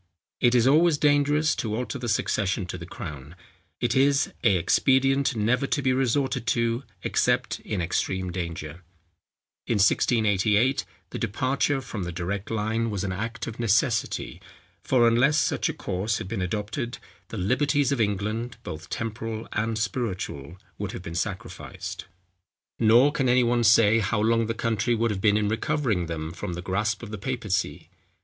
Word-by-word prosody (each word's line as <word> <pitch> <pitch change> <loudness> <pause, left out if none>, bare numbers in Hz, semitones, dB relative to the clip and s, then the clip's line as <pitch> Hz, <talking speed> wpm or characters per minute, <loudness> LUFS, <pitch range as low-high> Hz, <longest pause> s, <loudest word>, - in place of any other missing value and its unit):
It 120 0 +4
is 120 -1 +4
always 155 +3 +5
dangerous 145 +1 +3
to 110 -2 -2
alter 125 +3 -3
the 120 -1 -3
succession 100 -2 0
to 90 - -6
the 85 - -8
crown; 75 -4 -8 0.4
it 120 - 0
is 135 +1 +3
a 100 -5 +5
expedient 135 +8 +2
never 120 +6 +1
to - - 0
be 130 -2 +2
resorted 130 -1 0
to 115 +1 +1 0.2
except - - +1
in 95 -5 -3
extreme 90 +2 -1
danger. 85 -2 -5 0.9
In 115 - +1
1688, 105 +3 +2 0.3
the - - -5
departure 135 +6 0
from 110 -5 -6
the 90 -1 -3
direct 95 +4 -4
line 115 +1 -1
was 100 -3 -3
an 100 - -2
act 115 +5 -4
of 115 0 -7
necessity; 115 -2 0 0.4
for 120 -3 +4
unless 130 +6 +4
such 130 - +1
a - - -2
course 100 +5 -2
had - - -6
been 100 -1 -3
adopted, 105 +7 -3 0.3
the 115 - -7
liberties 140 +7 +1
of 135 -4 +1
England, 105 +3 -2
both 80 +4 -7
temporal 115 0 -4
and 110 +1 -1
spiritual, 95 - -3 0.2
would 100 -1 -4
have 90 - -7
been 80 - -7
sacrificed. 95 +3 -5 0.7
Nor 120 +6 +5
can 135 -4 0
any 125 0 +4
one 120 0 +2
say 115 0 +5
how 105 0 0
long 115 +1 +2
the 115 - -2
country 115 +1 0
would 115 0 +1
have 95 -2 -3
been 105 0 +4
in 105 -1 +1
recovering 110 - 0
them 80 -1 -4
from 85 0 -5
the 90 +1 -6
grasp 105 +5 -1
of 110 - -7
the 105 - -5
papacy. 110 -3 -3
110 Hz, 165 wpm, -26 LUFS, 100-125 Hz, 0.9 s, always